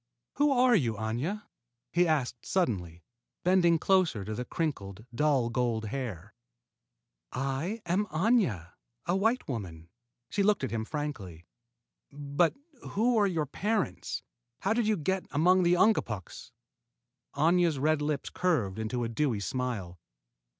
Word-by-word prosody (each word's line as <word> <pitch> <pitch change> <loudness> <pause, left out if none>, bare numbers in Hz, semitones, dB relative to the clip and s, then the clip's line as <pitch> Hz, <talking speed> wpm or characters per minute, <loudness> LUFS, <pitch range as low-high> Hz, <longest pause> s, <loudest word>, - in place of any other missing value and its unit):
"Who 290 0 +4
are 255 -1 +4
you, 120 - +1
Aña?" 120 - -3 0.5
he 175 +1 +3
asked 135 -6 0
suddenly, 90 - -1 0.4
bending 175 -2 +4
closer 170 - +2
to 110 - -4
the 125 - -3
crinkled, 110 - -3
dull 130 -3 +2
gold 115 -3 0
hair. 120 -11 -5 1.0
"I 135 - -2
am 185 +5 +1
Aña, 155 - +1 0.3
a 175 - +1
white 225 +6 +1
woman." 85 - -6 0.4
She 205 - 0
looked 205 -5 +2
at 130 - -2
him 110 -1 -2
frankly. 110 - -5 0.7
"But 145 +3 0 0.4
who 235 +4 +3
are 205 - +4
your 165 -5 0
parents, 205 +8 -2
and - - -34
how - - +2
did 230 -1 +1
you 215 -1 +2
get 190 +4 -1
among 180 +6 +4
the 175 0 +4
Ungapuks?" 120 - 0 0.8
Aña's 165 +1 +3
red 155 +2 +2
lips 150 -1 -2
curved 120 - 0
into 120 +3 -2
a - - 0
dewy 115 -1 0
smile. 100 -7 -3
145 Hz, 135 wpm, -29 LUFS, 110-185 Hz, 1.0 s, Who